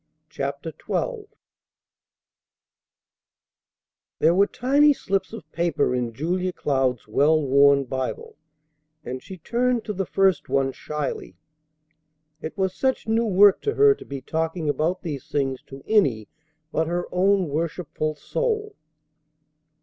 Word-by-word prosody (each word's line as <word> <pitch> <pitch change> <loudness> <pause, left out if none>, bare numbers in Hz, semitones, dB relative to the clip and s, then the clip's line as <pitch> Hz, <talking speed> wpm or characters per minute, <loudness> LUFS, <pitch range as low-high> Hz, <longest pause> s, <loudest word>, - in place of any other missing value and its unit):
CHAPTER 140 +3 -4
XII 460 -4 -2 2.9
There 165 - +4
were 200 +3 +4
tiny 285 +4 +3
slips 195 -7 -2
of 225 -1 -8
paper 170 -6 0
in 125 -2 -1
Julia 180 +8 -2
Cloud's 130 -8 -1
well 145 +8 +3
worn 140 0 +4
Bible, 135 - -4 0.7
and 130 -1 -5
she 190 - -10
turned 240 +6 0
to 210 - -3
the 195 -2 -3
first 190 -8 +2
one 135 0 +1
shyly. 145 -9 -5 1.1
It 160 - -6
was 190 -1 0
such 260 -3 -1
new 225 +1 +2
work 200 0 +5
to 425 - -1
her 420 0 +6
to - - -12
be 140 -1 -7
talking 160 +3 -2
about 160 +6 0
these 145 -4 -5
things 135 -3 -1
to 135 0 -11
any 135 - +2 0.4
but 160 0 0
her 175 +1 -1
own 190 0 +2
worshipful 155 0 -3
soul. 430 - -2
170 Hz, 125 wpm, -24 LUFS, 140-205 Hz, 2.9 s, her